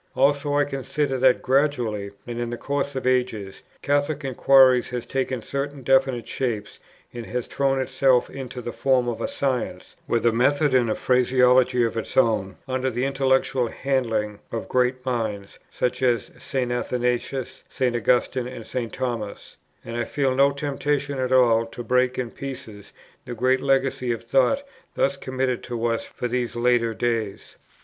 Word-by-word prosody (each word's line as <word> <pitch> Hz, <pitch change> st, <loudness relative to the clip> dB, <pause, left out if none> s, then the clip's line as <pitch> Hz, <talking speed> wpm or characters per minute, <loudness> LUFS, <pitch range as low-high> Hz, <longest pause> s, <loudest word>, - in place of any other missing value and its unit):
Also, 145 Hz, +1 st, +2 dB
I 145 Hz, -, +4 dB
consider 135 Hz, 0 st, -2 dB
that, 130 Hz, -1 st, +4 dB
gradually 125 Hz, -7 st, +1 dB, 0.2 s
and 120 Hz, 0 st, -5 dB
in 120 Hz, 0 st, -2 dB
the 120 Hz, -, -4 dB
course 140 Hz, +1 st, -2 dB
of 130 Hz, -, -3 dB
ages, 125 Hz, -6 st, -1 dB, 0.2 s
Catholic 145 Hz, 0 st, 0 dB
inquiry 130 Hz, -1 st, +5 dB
has 125 Hz, 0 st, -5 dB
taken 130 Hz, -3 st, -2 dB
certain 140 Hz, 0 st, -4 dB
definite 130 Hz, -2 st, +2 dB
shapes, 115 Hz, -6 st, -3 dB, 0.3 s
and 120 Hz, -1 st, -7 dB
has 125 Hz, -1 st, -3 dB
thrown 135 Hz, -1 st, 0 dB
itself 130 Hz, -1 st, +2 dB
into 130 Hz, -2 st, -7 dB
the 120 Hz, -, -4 dB
form 130 Hz, -2 st, +1 dB
of 120 Hz, -2 st, -3 dB
a -, -, 0 dB
science, 130 Hz, -3 st, -2 dB
with 115 Hz, 0 st, 0 dB
a 120 Hz, -, +5 dB
method 140 Hz, +5 st, +2 dB
and 125 Hz, -3 st, +3 dB
a 110 Hz, -, 0 dB
phraseology 125 Hz, 0 st, +3 dB
of 115 Hz, 0 st, -1 dB
its 115 Hz, -, -5 dB
own, 105 Hz, -6 st, +2 dB
under 130 Hz, 0 st, -1 dB
the 125 Hz, +1 st, -1 dB
intellectual 135 Hz, -2 st, +1 dB
handling 115 Hz, -6 st, -1 dB
of 115 Hz, -, -4 dB
great 125 Hz, 0 st, 0 dB
minds, 110 Hz, -6 st, -3 dB
such 125 Hz, -, -2 dB
as 120 Hz, -4 st, +1 dB
St. 125 Hz, -2 st, -2 dB
Athanasius, 125 Hz, +1 st, -2 dB
St. 125 Hz, -2 st, 0 dB
Augustine, 125 Hz, +1 st, +1 dB
and 120 Hz, -3 st, -8 dB
St. 120 Hz, -3 st, -4 dB
Thomas; 120 Hz, -5 st, -5 dB, 0.3 s
and 115 Hz, -, -6 dB
I 120 Hz, -1 st, -1 dB
feel 135 Hz, 0 st, 0 dB
no 140 Hz, +2 st, +5 dB
temptation 140 Hz, 0 st, -2 dB
at 130 Hz, 0 st, -1 dB
all 115 Hz, -3 st, +4 dB
to 120 Hz, +1 st, -8 dB
break 125 Hz, +2 st, +1 dB
in 125 Hz, -2 st, -3 dB
pieces 115 Hz, -7 st, -8 dB, 0.3 s
the 120 Hz, -, -6 dB
great 130 Hz, +3 st, +2 dB
legacy 135 Hz, -2 st, +1 dB
of 115 Hz, -, -3 dB
thought 135 Hz, -, +2 dB, 0.3 s
thus 140 Hz, +1 st, +1 dB
committed 130 Hz, -2 st, -2 dB
to 120 Hz, -2 st, -3 dB
us 115 Hz, -1 st, -1 dB
for 125 Hz, -, -4 dB
these 120 Hz, -1 st, -2 dB
latter 120 Hz, -1 st, +2 dB
days. 115 Hz, -4 st, -3 dB
125 Hz, 165 wpm, -24 LUFS, 120-135 Hz, 0.3 s, inquiry